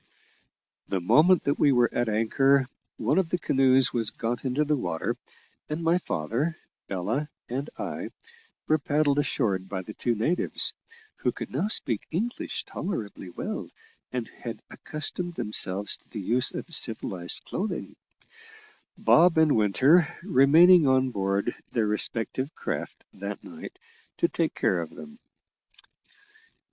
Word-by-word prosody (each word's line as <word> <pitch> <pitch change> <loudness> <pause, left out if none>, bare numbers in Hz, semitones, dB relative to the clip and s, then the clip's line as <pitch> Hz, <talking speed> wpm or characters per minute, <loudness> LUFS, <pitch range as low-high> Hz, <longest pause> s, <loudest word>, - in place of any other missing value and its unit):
The 95 - -1
moment 155 - +4
that 140 - 0
we 145 - +5
were 120 -2 +3
at 120 -1 0
anchor 135 +5 +3 0.3
one - - +1
of 180 -4 -1
the 180 - 0
canoes 135 -5 +3
was 115 -3 +1
got 115 +2 -4
into 135 +4 +1
the 150 0 +2
water, 85 - -2 0.5
and 155 +2 -3
my 165 +2 +3
father, 125 - -2 0.3
Ella, 105 +11 -2 0.2
and 135 +5 -4
I - - -5 0.6
were 155 0 +3
paddled 145 0 +1
ashore 120 -9 0
by 95 0 -6
the 105 - -9
two 120 +1 -1
natives 155 +12 0 0.4
(who - - 0
could - - -7
now 205 - 0
speak 115 - +1
English 220 +9 -3
tolerably 105 - -5
well, 85 - -5 0.4
and 125 -3 -3
had 115 -1 -8
accustomed 170 +3 -4
themselves 100 - 0
to - - -28
the 110 - -6
use 120 +6 +2
of 170 - -5
civilised 95 - +1
clothing), 210 +3 -4 1.0
Bob 170 0 +5
and 160 -2 +5
Winter 135 - +3
remaining 165 0 +6
on 130 -1 +3
board 100 +2 -1 0.2
their 115 -3 +1
respective 115 +6 0
craft - - -5
that - - -6
night - - -10 0.4
to 340 - +3
take 165 - -1
care 95 -8 +1
of 80 - -6
them. 225 +2 -12
130 Hz, 140 wpm, -26 LUFS, 110-160 Hz, 1.0 s, remaining